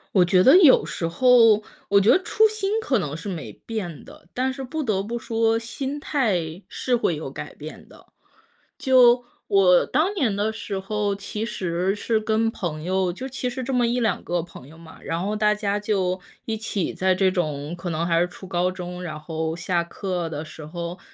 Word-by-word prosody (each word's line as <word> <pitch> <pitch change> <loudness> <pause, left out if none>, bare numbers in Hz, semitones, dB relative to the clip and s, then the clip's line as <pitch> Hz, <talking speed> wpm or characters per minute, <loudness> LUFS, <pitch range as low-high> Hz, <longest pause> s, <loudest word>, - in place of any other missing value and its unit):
我 185 - +7
觉 180 +1 +4
得 265 - +7
有 310 -8 +6
时 165 - -4
候 230 +1 +5 0.3
我 200 - +6
觉 200 +3 +3
得 - - +7
初 440 0 +4
心 420 -2 -3
可 260 - +1
能 150 -4 -4
是 165 - -8
没 180 -5 -5
变 195 -9 -5
的， 170 - -16
但 260 +1 0
是 270 0 -6
不 310 +5 -4
得 210 -8 0
不 235 +3 -4
说， 225 0 +1
心 270 +5 -5
态 190 - -1
是 250 - 0
会 175 -9 0
有 150 - -6
改 150 +2 -8
变 155 +1 -10
的。 - - -18 0.7
就 250 -2 +5 0.2
我 185 -3 +5
当 320 +9 +1
年 260 - 0
的 210 +2 -1
时 210 -2 -5
候， 205 +1 -1
其 200 +2 -5
实 185 -3 -1
是 220 +1 0
跟 220 +1 +1
朋 155 -7 -4
友， 185 +1 0
就 255 +9 -6
其 260 -1 -3
实 255 +1 -5
这 265 +2 -3
么 245 -2 +2
1-2 235 -2 0
个 175 -1 -1
朋 165 -6 -13
友 160 +3 -15
嘛， 165 -1 -14
然 165 +3 -3
后 210 +1 -1
大 210 0 +2
家 205 -1 -1
就 190 -3 -1 0.2
一 225 - -2
起 215 -4 -2
在 185 0 +1
这 185 0 +3
种 155 -3 -2
可 175 +1 -5
能 165 0 -1
还 165 -1 +2
是 175 - +2
初 185 +2 -12
高 180 0 0
中， 180 -1 -7
然 155 -4 -6
后 160 0 -3
下 170 0 0
课 175 -1 -4
的 150 -1 -5
时 155 0 -10
候， 170 +3 -6
195 Hz, 220 characters per minute, -23 LUFS, 175-230 Hz, 0.7 s, 我